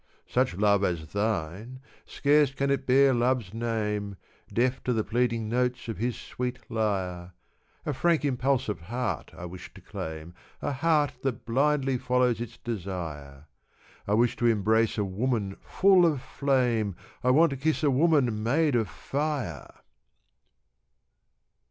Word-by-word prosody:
Such 125 -6 0
love 100 -1 +3
as 85 -4 -2
thine, 105 +3 -2 0.3
scarce 145 -1 +3
can 140 0 0
it 135 -1 -1
bear 135 +1 +5
love's 120 -4 0
name, 105 -3 -2 0.4
Deaf 125 +2 0
to 125 - +1
the 110 -2 0
pleading 115 -1 0
notes 125 +2 -1
of 115 - -4
his 120 +1 -1
sweet 125 0 -4
lyre, 95 -5 -2 0.5
A 150 - -1
frank, 165 +2 +2
impulsive 130 -4 0
heart 120 +8 -3
I 85 - -7
wish 90 +1 -9
to - - -11
claim, 80 +1 -7 0.3
A - - -2
heart 145 0 +2
that 135 -4 -3
blindly 135 +1 +1
follows 125 -2 +1
its 120 0 -7
desire. 85 - -6 0.6
I 105 - +2
wish 120 +2 +2
to 120 - +2
embrace 110 +1 +2
a 105 - +1
woman 100 0 -1
full 190 -2 +4
of 150 -5 0
flame, 125 -8 0 0.3
I 125 - +3
want 155 +4 +5
to - - -2
kiss 155 +4 0
a 145 - +4
woman 135 -6 +3
made 145 +6 +2
of 110 -5 +1
fire. 135 - -3
120 Hz, 145 wpm, -27 LUFS, 105-135 Hz, 0.6 s, bear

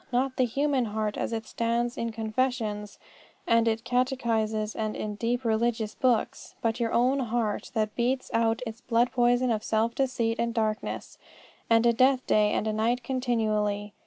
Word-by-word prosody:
Not 260 +1 0
the 255 - +3
human 275 +1 0
heart 215 -1 -2
as - - -2
it 225 -1 -3
stands 235 +1 -1
in 230 0 -3
confessions, 220 -2 -2 0.5
and 230 0 +3
in 220 -1 +2
catechisms, 225 -3 -1
and 215 -1 -2
in 210 -1 -4
deep 235 +4 -2
religious 225 -1 0
books, 245 -4 0
but 230 +1 -1
your 230 -1 0
own 255 +4 +2
heart 230 -4 -1
that 215 -1 0
beats 255 +2 -1
out 230 +1 +1
its 225 +1 -7
blood 240 0 +1
poison 245 0 +2
of 215 -1 -1
self 225 +1 +1
deceit, 245 -4 0
and 235 0 -1
darkness, 215 -1 -2 0.5
and 230 +1 +4
death 260 0 +4
day 210 -1 +3
and 215 0 -1
night 235 +3 0
continually. 215 -5 -1
230 Hz, 160 wpm, -27 LUFS, 220-245 Hz, 0.5 s, and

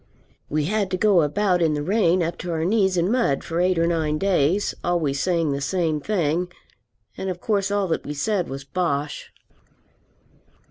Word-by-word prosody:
We 150 +1 0
had 205 +2 0
to 185 - -1
go 195 -2 +4
about 180 +4 +1
in 160 -2 +2
the 145 - -2
rain 185 -2 +2
up 170 +1 -3
to 180 - -5
our 160 -1 -1
knees 190 -2 +2
in 175 +4 +1
mud 235 - +1
for 165 +1 -3
eight 180 0 +2
or 165 - +3
nine 160 -3 0
days, 190 +1 +1
always 160 -6 0
saying 170 -3 +1
the 140 0 -2
same 160 -1 0
thing. 175 -2 0 0.7
And 190 - -3
of 180 -1 -4
course 200 -1 0
all 205 -1 +1
that 160 - -1
we 150 - -5
said 185 +4 -1
was 135 +1 -6
bosh. 145 -1 -2
175 Hz, 185 wpm, -23 LUFS, 155-190 Hz, 0.7 s, go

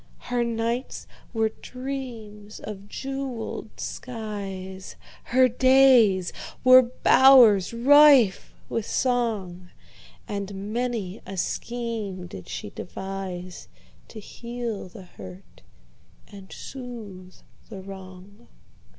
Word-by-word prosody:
Her 245 -1 -2
nights 235 +2 -3 0.3
were 220 -1 +1
dreams 240 -6 -7
of 205 -1 -8
jeweled 270 0 -6
skies, 195 -5 -6 0.3
Her 255 +1 +4
days 250 -7 +4 0.3
were 255 0 +9
bowers 245 -5 +6
rife 270 -2 +5 0.2
with 225 - -3
song, 210 -8 -1 0.6
And 200 0 -5
many 230 -6 -3
a 195 0 -7
scheme 220 -3 -4
did 95 - -10
she 100 - -6
deviseTo 185 -1 -7 0.5
heal 235 -1 -6
the 190 +1 -12
hurt 95 - -13 0.7
and 195 -2 -13
soothe 220 -8 -9 0.3
the 190 -1 -9
wrong. 190 +3 -12
215 Hz, 90 wpm, -25 LUFS, 190-245 Hz, 0.7 s, were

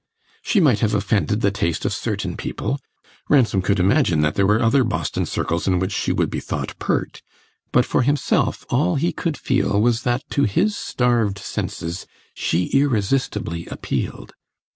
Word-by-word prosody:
She 210 - +2
might 135 - +4
have 105 0 +1
offended 105 +1 0
the 100 - +2
taste 85 -5 -2
of - - 0
certain - - -3
people 140 - -3 0.5
Ransom 120 -9 +4
could 100 +1 +1
imagine 90 - +3
that 75 0 +1
there 100 -1 +2
were 105 +2 +3
other 130 +4 +3
Boston 115 - -2
circles 85 +3 -2
in 90 -1 +3
which 95 +2 -1
she - - -1
would - - 0
be - - -2
thought - - -4
pert; - - -2 0.5
but - - +4
for - - +1
himself 140 +3 +1
all 90 - +2
he 165 +5 +1
could 165 -4 -3
feel 125 -5 +1
was 115 +1 +2
that 125 0 -1
to 140 - +2
his 195 - +1
starved 120 - 0
senses 85 -2 -5 0.3
she 85 +2 0
irresistibly 125 -9 0
appealed. - - -4
110 Hz, 165 wpm, -21 LUFS, 95-135 Hz, 0.5 s, might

